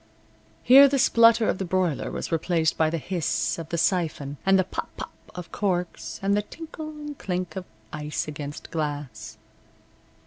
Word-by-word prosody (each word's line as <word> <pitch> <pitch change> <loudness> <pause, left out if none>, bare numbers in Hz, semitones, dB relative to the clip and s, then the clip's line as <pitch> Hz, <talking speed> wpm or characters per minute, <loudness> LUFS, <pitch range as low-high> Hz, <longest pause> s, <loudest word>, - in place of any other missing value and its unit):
Here 275 +3 +9
the 275 0 +1
splutter 230 -2 +5
of - - 0
the - - -1
broiler 180 -4 0
was - - -5
replaced 165 -1 +1
by 160 -1 +2
the 165 - -2
hiss 160 - -1
of 165 -1 -7
the 170 - -2
siphon, 160 -5 0
and 195 0 +6
the 190 - +3
pop 180 - -5
pop - - -7 0.2
of 180 -1 -8
corks, 180 -4 -2
and 200 +1 +2
the 210 - +2
tinkle 315 +6 -8
and 295 -1 -8
clink 180 -1 -3
of 190 -1 -5 0.3
ice 150 0 -3
against 145 -1 -7
glass. 145 -9 -4
175 Hz, 170 wpm, -25 LUFS, 150-205 Hz, 0.3 s, Here